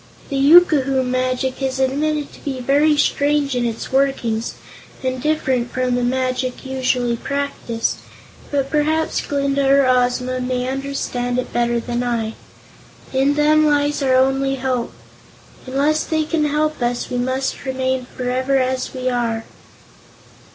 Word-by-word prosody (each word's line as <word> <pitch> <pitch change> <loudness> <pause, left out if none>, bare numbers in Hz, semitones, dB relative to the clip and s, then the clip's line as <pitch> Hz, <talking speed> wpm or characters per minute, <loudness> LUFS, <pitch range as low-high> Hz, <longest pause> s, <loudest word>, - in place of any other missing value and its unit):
The 275 - -3
yookoohoo 275 -3 +5
magic 255 +1 -1
is 265 -1 -1
admitted 290 +3 0
to - - -15
be 270 -3 -3
very 290 +4 +3
strange 285 -1 +1
in 245 -1 0
its 230 -1 -4
workings 260 -5 0 0.5
and 255 -1 -2
different 265 -5 0
from 255 -1 0
the 245 0 0
magic 255 +1 -1
usually 255 -2 0
practiced, 280 -3 -2 0.5
but 275 -2 -1
perhaps 315 +1 +1
Glinda 280 -1 0
or 275 0 +5
Ozma 250 0 +1
may 250 0 -2
understand 260 -2 -2
it 255 - -3
better 240 0 +1
than 240 +1 -3
I. 230 -2 -1 0.8
In 270 +2 +2
them 305 +1 +4
lies 290 0 +1
our 260 -2 +3
only 270 +1 +2
hope. 255 -2 -2 0.8
Unless 285 +4 +1
they 315 -1 0
can 310 0 0
help 300 0 0
us, 240 0 -1
we 250 - -1
must 260 +2 -2
remain 260 -1 -1
forever 255 +2 0
as 260 0 -1
we 255 0 -3
are." 235 -3 -1
260 Hz, 140 wpm, -20 LUFS, 250-280 Hz, 0.8 s, yookoohoo